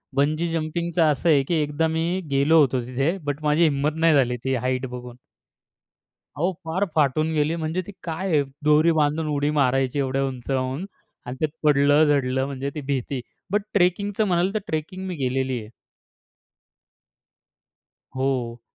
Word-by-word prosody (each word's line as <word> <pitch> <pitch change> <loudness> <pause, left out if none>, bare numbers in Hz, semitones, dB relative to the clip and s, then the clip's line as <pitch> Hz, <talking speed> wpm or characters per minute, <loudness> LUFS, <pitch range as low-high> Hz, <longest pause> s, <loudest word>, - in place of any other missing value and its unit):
Bungee 155 +4 +1
जंपिंगचं 165 +2 -1
असं 155 +4 0
आहे 140 -3 +5
की 170 - +1
एकदा 150 +2 0
मी 165 +3 -1
गेलो 140 +4 +4
होतो 130 -3 +2
तिथे. 135 +8 0
बट 145 +1 -4
माझी 150 +3 +3
हिंमत 150 +1 +1
नाही 165 -1 +4
झाली 125 -3 +2
ती 135 - 0
हाईट 130 +1 -1
बघून. 125 -1 -9 1.2
अहो, 175 +6 0
फार 165 +5 0
फाटून 155 +1 +2
गेली. 155 +2 +1
म्हणजे 160 +2 -2
ती 205 - -8
काय 170 +3 -4
आहे 150 -3 +3 0.2
दोरी 150 +2 +5
बांधून 155 +1 +1
उडी 145 0 0
मारायची 135 -2 +1
एवढ्या 135 0 0
उंचावून 130 +4 -3 0.4
आणि 125 +1 -5
त्यात 155 -2 +1 0.2
पडलं, 145 +1 +5
झडलं 135 -3 +1
म्हणजे 140 0 -4
ती 155 - -4
भीती. 135 -1 -3 0.3
बट 205 - +2
ट्रेकिंगचं 200 +3 +2
म्हणाल 180 +1 +1
तर - - +2
ट्रेकिंग 185 +5 -4
मी 180 -3 -4
केलेली 130 -1 -1
आहे. 105 0 -11 2.5
हो. 125 -3 -1
150 Hz, 155 wpm, -24 LUFS, 135-165 Hz, 2.5 s, आहे